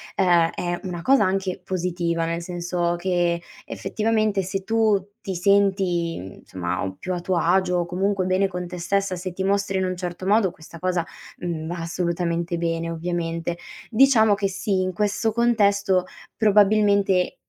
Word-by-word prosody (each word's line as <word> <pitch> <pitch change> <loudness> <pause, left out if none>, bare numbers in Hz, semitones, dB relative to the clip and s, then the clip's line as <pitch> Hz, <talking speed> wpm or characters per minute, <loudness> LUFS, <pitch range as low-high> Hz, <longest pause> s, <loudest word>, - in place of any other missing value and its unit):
ehm, 175 -3 +4
è 175 0 -2
una 180 -3 -5
cosa 265 -5 +4
anche 190 -1 -1
positiva, 175 -2 -1
nel 170 +1 -2
senso 175 0 -2
che 175 -1 0 0.3
effettivamente 215 -2 0
se 190 +1 -4
tu 220 -1 +2 0.2
ti 195 -3 -4
senti, 190 -3 +2
mhmm, 95 +1 -10
somma, 90 -1 -3
uhm, 95 0 -4
più 185 - -3
a 175 - -2
tuo 180 0 0
agio 180 +1 +2
o 175 - 0
comunque 190 +2 0
bene 185 +2 +2
con 180 -1 -5
te 180 +1 -7
stessa, 195 +2 0
se 180 +1 -5
ti 190 +2 -4
mostri 195 0 +1
in 190 - +1
un 185 0 -2
certo 180 0 -5
modo, 205 0 +3
questa 165 +1 -13
cosa, 180 -1 0 0.3
mhmm, 165 -3 -4
va 175 +2 -4
assolutamente 170 0 -2
bene, 165 0 -2
ovviamente. 170 0 -3 0.3
Diciamo 225 -3 +5
che 200 0 0
sì, 195 0 -1
in 185 0 -1
questo 210 +3 0
contesto, 200 -5 +2 0.3
probabilmente, 205 -3 +3
185 Hz, 165 wpm, -23 LUFS, 170-200 Hz, 0.3 s, Diciamo